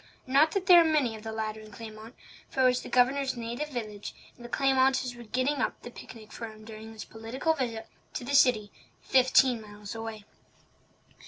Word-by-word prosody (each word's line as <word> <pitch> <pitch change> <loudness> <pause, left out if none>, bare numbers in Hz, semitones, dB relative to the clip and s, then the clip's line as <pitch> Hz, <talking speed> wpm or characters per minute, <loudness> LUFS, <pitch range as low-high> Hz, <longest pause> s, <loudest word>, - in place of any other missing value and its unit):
Not 285 +4 +4
that 390 -2 -1
there 350 -3 +9
were 320 - +1
many 265 -7 +1
of 215 - -10
the 220 0 -6
latter 220 -1 -3
in 215 0 -12
Claymont, 220 +1 -10 0.3
for 265 - -1
it - - +5
was 250 0 +3
the - - -9
Governor's 260 +1 +2
native 240 +6 -4
village, 215 -6 -6 0.2
and 240 - -15
the 240 - -8
Claymonters 260 -1 +2
were 240 - -11
getting 255 +6 0
up - - -2
the 240 - -8
picnic 220 -3 -12
for 230 - -6
him 215 0 -13
during 220 0 -9
his 220 -1 -8
political 230 +8 -2
visit 230 -6 -3 0.3
to - - -3
the 275 +4 -4
city 245 -7 +4 0.3
fifteen 255 -2 +4
miles 205 -1 -9
away. 225 -2 -7
240 Hz, 195 wpm, -29 LUFS, 220-265 Hz, 0.3 s, there